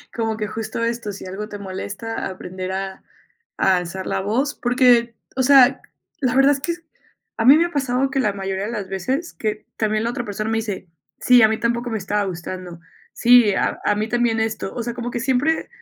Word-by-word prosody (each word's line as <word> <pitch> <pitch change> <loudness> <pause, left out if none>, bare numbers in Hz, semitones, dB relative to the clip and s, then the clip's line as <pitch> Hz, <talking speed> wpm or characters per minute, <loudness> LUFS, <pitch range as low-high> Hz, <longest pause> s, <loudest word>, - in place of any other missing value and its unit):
Como 225 -2 -1
que 210 - -2
justo 225 +2 -4
esto, 230 -2 -2
si 195 - -9
algo 200 +4 -6
te 205 - -6
molesta, 200 +3 -5
aprender 185 0 -6
a 190 0 -5 0.5
a 190 -1 +3
alzar 180 +2 -5
la - - -1
voz, 250 +9 0
porque, 245 -2 +3 0.2
o - - +2
sea, 265 -1 +6 0.4
la 255 -3 0
verdad 270 +1 +6
es 280 - -3
que 340 - -1 0.6
a 225 - 0
mí 275 +4 +9
me 335 - +3
ha - - -12
pasado 265 -2 0
que 270 - 0
la 210 -6 +1
mayoría 195 0 -3
de 220 - -4
las 205 -5 -5
veces 260 - -2
que 215 -1 -3
también 215 0 0
la 230 - 0
otra 240 0 -4
persona 215 +1 -3
me 225 - 0
dice, 205 -5 -4 0.3
sí, 250 -1 +6
a 220 - +8
mí 220 - 0
tampoco 235 +1 -1
me 225 - -2
estaba 205 +1 -1
gustando. 180 -1 -6 0.3
Sí, 240 -3 +5
a - - 0
a 205 - +3
mí 215 +2 -2
también 240 -2 +1
esto. 220 -3 -3
O 240 - -3
sea, 240 +1 -3
como 240 0 -4
que 235 - -3
siempre 265 +5 +1
225 Hz, 215 wpm, -21 LUFS, 195-245 Hz, 0.6 s, mí